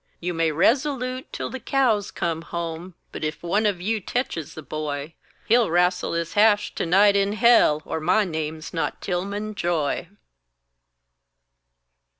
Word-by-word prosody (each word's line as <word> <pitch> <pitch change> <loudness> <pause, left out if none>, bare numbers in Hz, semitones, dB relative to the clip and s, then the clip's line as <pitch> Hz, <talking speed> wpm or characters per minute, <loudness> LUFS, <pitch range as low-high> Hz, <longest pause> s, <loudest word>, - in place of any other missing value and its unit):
You 175 +1 -3
may 165 -1 +1
rezoloot 255 - 0
till - - -4
the 260 - -5
cows 240 -7 +1
come 165 -1 -2
home, 170 +1 -6 0.2
But - - -7
ef 155 +2 -3
one 205 +5 +1
of 195 -4 -1
you 215 +5 -1
tetches 190 - -3
the 155 - -8
boy, 150 0 -4 0.3
He'll 235 -2 +3
wrastle 180 +1 +1
his 170 0 -2
hash 210 0 +3
to - - -2
night 200 +4 +5
in 200 0 +2
hell, 220 -10 +4
Or - - -3
my 185 +7 +2
name's 160 -2 -5
not 165 - -2
Tilmon 200 +4 -3
Joy! 170 -6 -1
180 Hz, 150 wpm, -24 LUFS, 165-215 Hz, 0.3 s, night